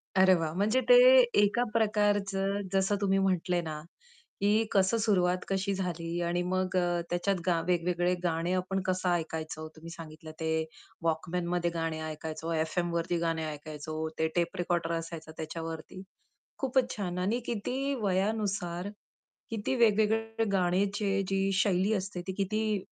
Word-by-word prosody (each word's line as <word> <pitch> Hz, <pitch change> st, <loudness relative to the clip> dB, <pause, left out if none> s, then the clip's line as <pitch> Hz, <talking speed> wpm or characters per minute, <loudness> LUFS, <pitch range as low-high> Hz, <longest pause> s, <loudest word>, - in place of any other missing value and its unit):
अरे, 190 Hz, 0 st, +6 dB
वाह! 160 Hz, -2 st, -2 dB
म्हणजे 215 Hz, +8 st, +2 dB
ते -, -, +10 dB, 0.5 s
एका 205 Hz, +4 st, +3 dB
प्रकारचं 205 Hz, -3 st, +1 dB
जसं 195 Hz, +1 st, +2 dB
तुम्ही 195 Hz, -1 st, +2 dB
म्हटले 180 Hz, -2 st, +1 dB
ना, 155 Hz, -2 st, -5 dB, 0.6 s
की 210 Hz, +2 st, +3 dB
कसं 195 Hz, +3 st, +3 dB
सुरुवात 180 Hz, -4 st, +3 dB
कशी 195 Hz, +1 st, 0 dB
झाली 175 Hz, -2 st, -3 dB
आणि 175 Hz, +1 st, 0 dB
मग 185 Hz, 0 st, -1 dB
अ, 175 Hz, -1 st, +1 dB
त्याच्यात 175 Hz, +3 st, +1 dB
गा 175 Hz, -2 st, +2 dB
वेगवेगळे 175 Hz, 0 st, +1 dB
गाणे 170 Hz, 0 st, 0 dB
आपण 185 Hz, +1 st, -1 dB
कसं 185 Hz, 0 st, 0 dB
ऐकायचो 160 Hz, -2 st, -2 dB
तुम्ही 165 Hz, +1 st, -10 dB
सांगितलं 155 Hz, -1 st, -9 dB
ते 160 Hz, 0 st, -1 dB, 0.5 s
वॉकमनमध्ये 170 Hz, +1 st, 0 dB
गाणे 165 Hz, -1 st, -2 dB
ऐकायचो, 160 Hz, +1 st, -5 dB
एफएमवरती 170 Hz, +1 st, 0 dB
गाणे 165 Hz, -1 st, -1 dB
ऐकायचो 155 Hz, +1 st, -5 dB
ते 160 Hz, -, +3 dB
टेप 170 Hz, -1 st, 0 dB
रेकॉर्डर 175 Hz, -1 st, 0 dB
असायचा 165 Hz, -1 st, -7 dB
त्याच्यावरती, 165 Hz, +2 st, -6 dB, 0.6 s
खूपच 260 Hz, -2 st, +1 dB
छान 180 Hz, -3 st, -3 dB
आणि 205 Hz, +7 st, 0 dB
किती 260 Hz, +5 st, -2 dB
वयानुसार 195 Hz, -2 st, -1 dB, 0.6 s
किती 225 Hz, +4 st, -1 dB
वेगवेगळे 225 Hz, 0 st, +2 dB
गाण्याची 195 Hz, +2 st, +1 dB
जी 195 Hz, 0 st, +1 dB
शैली 195 Hz, +1 st, +2 dB
असते 195 Hz, -2 st, -3 dB
ती 190 Hz, -, -2 dB
किती 215 Hz, +2 st, 0 dB
180 Hz, 135 wpm, -30 LUFS, 165-200 Hz, 0.6 s, ते